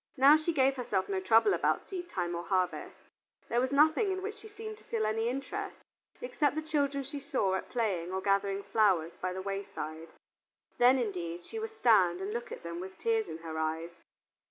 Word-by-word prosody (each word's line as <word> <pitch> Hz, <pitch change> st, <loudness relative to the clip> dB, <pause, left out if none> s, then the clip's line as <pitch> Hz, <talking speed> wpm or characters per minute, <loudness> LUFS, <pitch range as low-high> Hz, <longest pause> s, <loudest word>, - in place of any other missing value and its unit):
Now 275 Hz, +3 st, +8 dB
she 310 Hz, +2 st, 0 dB
gave 270 Hz, -3 st, +2 dB
herself 215 Hz, -6 st, -1 dB
no 195 Hz, -1 st, -1 dB
trouble 225 Hz, -, +4 dB
about -, -, +1 dB
seedtime 345 Hz, -, -4 dB
or 170 Hz, 0 st, -3 dB
harvest; 185 Hz, -2 st, -1 dB, 0.5 s
there 240 Hz, +1 st, +2 dB
was 260 Hz, +1 st, 0 dB
nothing 315 Hz, +8 st, +4 dB
in 375 Hz, 0 st, -3 dB
which 415 Hz, +1 st, -3 dB
she 435 Hz, -, -11 dB
seemed 435 Hz, 0 st, -8 dB
to -, -, -20 dB
feel 220 Hz, -2 st, -1 dB
any 225 Hz, +2 st, 0 dB
interest, 275 Hz, +11 st, -4 dB, 0.4 s
except 310 Hz, -13 st, 0 dB
the 310 Hz, -, -2 dB
children 285 Hz, -3 st, 0 dB
she 285 Hz, +2 st, -6 dB
saw 270 Hz, -10 st, 0 dB
at 190 Hz, -, -3 dB
play 195 Hz, -8 st, -1 dB
or 190 Hz, +1 st, -2 dB
gathering 195 Hz, 0 st, +1 dB
flowers 190 Hz, -8 st, +2 dB
by 185 Hz, -, -1 dB
the 190 Hz, +1 st, -5 dB
wayside. 195 Hz, -5 st, -5 dB, 0.7 s
Then, 250 Hz, +2 st, +6 dB
indeed, 175 Hz, -7 st, -3 dB
she 450 Hz, -, -6 dB
would 440 Hz, 0 st, -5 dB
stand 185 Hz, -, +4 dB
and 195 Hz, +2 st, -4 dB
look 235 Hz, +1 st, -5 dB
at -, -, -7 dB
them 170 Hz, 0 st, -5 dB
with 190 Hz, +1 st, -8 dB
tears 450 Hz, -2 st, +1 dB
in -, -, -5 dB
her 160 Hz, -1 st, -4 dB
eyes. 160 Hz, +2 st, -2 dB
225 Hz, 200 wpm, -31 LUFS, 185-300 Hz, 0.7 s, Now